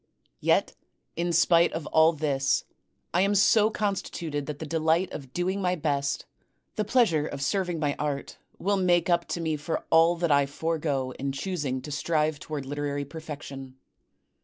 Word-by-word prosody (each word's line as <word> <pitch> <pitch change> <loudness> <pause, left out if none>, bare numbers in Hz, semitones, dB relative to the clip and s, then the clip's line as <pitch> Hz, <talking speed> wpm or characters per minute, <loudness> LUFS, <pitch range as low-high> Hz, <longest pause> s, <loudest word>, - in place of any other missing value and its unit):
Yet - - +2 0.4
in 170 +1 -1
spite 170 +1 +4
of 160 -2 -4
all 160 +1 +5
this, 145 -4 0 0.5
I 175 - +3
am 200 +1 +2
so 210 +2 +5
constituted 175 -8 -3
that 150 -2 -4
the 160 - -6
delight 160 +3 +1
of 135 -4 -8
doing 185 +5 -1
my 180 -1 +1
best, 145 -3 -1 0.5
the 215 - 0
pleasure 205 - +2
of 140 - -6
serving 180 +1 0
my 145 -2 0
art, 145 -2 -3 0.2
will 200 +2 0
make 180 -1 +2
up 170 0 +2
to - - -3
me 160 -2 -1
for 155 +3 -3
all 165 +1 +5
that 170 -2 0
I 140 -1 +4
forego 145 -3 -2
in 140 0 -1
choosing 135 -4 -3
to 150 - -7
strive 155 0 0
toward 150 -3 -5
literary 145 0 -3
perfection. 140 -3 -8
160 Hz, 165 wpm, -27 LUFS, 145-175 Hz, 0.5 s, all